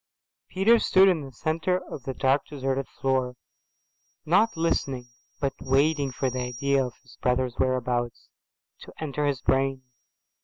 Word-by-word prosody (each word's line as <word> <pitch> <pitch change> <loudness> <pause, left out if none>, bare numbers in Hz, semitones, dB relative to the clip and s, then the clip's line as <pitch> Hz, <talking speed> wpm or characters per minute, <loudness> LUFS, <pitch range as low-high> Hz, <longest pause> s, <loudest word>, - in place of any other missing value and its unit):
Peter 220 +5 +4
stood 190 -2 +5
in 180 -5 +3
the 135 -1 -8
centre 165 +7 0
of 130 - -7
the 135 - -3
dark 135 +1 +2
deserted 135 -2 -2
floor, 130 -2 -1 0.9
not 200 +5 +3
listening 135 -7 -1 0.3
but 135 -2 -1
waiting 140 +1 +2
for 130 +1 -1
the 130 0 -3
idea 135 +3 0
of 125 -2 -6
his 130 - -18
brother's 125 -1 0
whereabouts 125 -2 -1 0.5
to - - -12
enter 150 -1 -1
his 135 -4 -1
brain. 135 0 +1
135 Hz, 145 wpm, -26 LUFS, 130-155 Hz, 0.9 s, stood